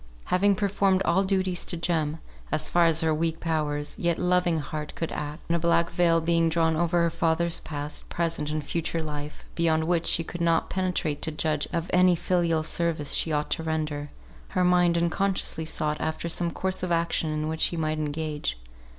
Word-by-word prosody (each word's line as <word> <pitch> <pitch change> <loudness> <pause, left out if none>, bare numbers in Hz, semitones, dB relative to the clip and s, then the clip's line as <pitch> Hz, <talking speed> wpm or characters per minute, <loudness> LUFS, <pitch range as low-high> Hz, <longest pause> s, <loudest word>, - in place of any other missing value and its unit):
Having 200 +2 +4
performed 195 -1 +1
all 180 +3 +3
duties 190 -2 0
to 175 - -3
Jem, 160 -2 -1 0.3
as 155 - +1
far 175 -1 +4
as 165 0 +3
her 160 -1 +2
weak 165 +1 -1
powers, 150 -3 -1
yet 170 -1 +1
loving 180 -2 +2
heart 150 0 -5
could 165 - -3
act; 150 +2 -5
and 170 - +1
a - - +1
black 170 0 +2
veil 170 -1 +3
being 165 0 +2
drawn 160 0 +2
over 170 +1 +2
her 170 - +1
father's 170 0 +1
past, 150 -1 -5
present, 165 -3 -1
and 155 0 -2
future 165 +2 -2
life, 150 -1 -6
beyond 160 -2 +2
which 170 0 0
she 165 - +4
could 175 +1 -7
not 165 -1 +1
penetrate 180 -5 -1
to - - -1
judge 150 -1 -1
of 170 0 -2
any 180 0 +5
filial 170 -2 +1
service 160 -3 0
she 160 - +1
ought 150 0 -1
to - - 0
render; 155 -2 -3 0.5
her 180 - +4
mind 175 -1 +4
unconsciously 170 -1 0
sought 150 -1 -1
after 160 +1 -2
some 170 +1 0
course 190 +2 -2
of 180 -1 -2
action 170 -1 +1
in 155 0 -2
which 160 0 -3
she 170 - +2
might 155 -1 -1
engage. 150 - -3
165 Hz, 195 wpm, -26 LUFS, 155-175 Hz, 0.5 s, any